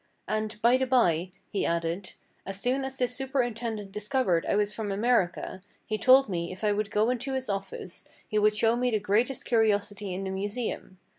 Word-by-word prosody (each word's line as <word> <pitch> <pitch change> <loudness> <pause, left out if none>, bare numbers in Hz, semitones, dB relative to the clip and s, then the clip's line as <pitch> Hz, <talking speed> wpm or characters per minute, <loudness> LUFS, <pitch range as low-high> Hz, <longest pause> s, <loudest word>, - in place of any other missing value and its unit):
"And, 215 0 -2
by 240 +2 +6
the 260 0 0
by," 180 -9 +3 0.2
he 200 - 0
added, 170 +3 -2 0.3
"as 195 0 -5
soon 255 +5 0
as 265 0 -4
this 250 -1 0
superintendent 240 -6 -2
discovered 210 -4 0
I - - +2
was 210 0 +1
from 210 0 -3
America, 195 -4 0 0.2
he 215 -1 -2
told 260 +3 +6
me 170 -3 -3
if 185 +3 -9
I 210 - +3
would 205 0 -1
go 215 +3 +2
into 255 +2 -3
his 260 -3 -2
office 195 -2 -5 0.2
he 215 - +1
would 210 0 +3
show 225 +1 +3
me 250 +1 +1
the 220 -3 +1
greatest 220 +6 0
curiosity 205 -3 +1
in 185 +2 -3
the 190 - -3
Museum. 200 0 -4
215 Hz, 195 wpm, -28 LUFS, 195-245 Hz, 0.3 s, by